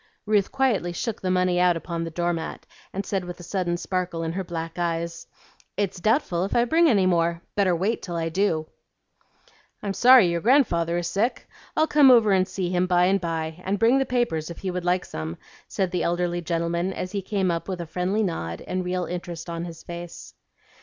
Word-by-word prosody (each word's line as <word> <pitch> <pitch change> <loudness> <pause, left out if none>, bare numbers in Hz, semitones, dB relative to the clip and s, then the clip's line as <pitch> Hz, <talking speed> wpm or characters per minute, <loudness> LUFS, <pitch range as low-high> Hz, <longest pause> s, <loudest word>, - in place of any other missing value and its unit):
Ruth 210 -2 +2
quietly 240 -10 +1
shook 225 +5 -3
the 185 - -1
money 180 -1 +2
out 180 -1 +4
upon 165 0 -4
the 165 - -4
door 175 +1 -1
mat, 165 -1 -5 0.3
and 195 +1 -4
said 195 -2 -1
with 175 0 -8
a - - -9
sudden 175 -1 -1
sparkle 180 -2 -2
in 160 - -2
her 190 +3 -3
black 165 -1 -5
eyes, 170 -1 -2 0.5
"It's 195 -2 -1
doubtful 215 - +1
if 195 - -2
I 240 - +4
bring 325 +5 +4
any 200 -7 +3
more. 170 -1 +1
Better 190 -4 +2
wait 195 +7 -1
till 175 - -5
I 165 -1 -1
do." 165 -3 0 1.2
"I'm 200 -1 -2
sorry 250 0 +7
your 170 0 -1
grandfather 175 - +3
is 175 - -2
sick. 205 +8 -1 0.3
I'll 315 - +5
come 295 -3 +6
over 230 -4 +6
and 185 -1 +3
see 180 -3 -3
him 180 0 +1
by 180 -1 +4
and 195 +1 +2
by, 165 0 -3
and 195 +2 -1
bring 235 +5 +4
the 270 - +1
papers 205 -11 0
if 170 - -8
he 190 - -3
would 180 -1 -4
like 180 +1 +1
some," 80 +1 -6 0.3
said 190 -2 -1
the 180 - -1
elderly 175 0 0
gentleman 170 +2 -1
as 185 - -5
he 200 -1 -2
came 190 -2 0
up 165 -1 -3
with 185 -2 -4
a 170 - -4
friendly 180 +6 -1
nod 85 - -3
and 185 0 -3
real 180 0 -2
interest 175 -1 -6
in 170 0 -4
his 165 -2 -9
face. 175 0 -8
180 Hz, 215 wpm, -25 LUFS, 170-195 Hz, 1.2 s, sorry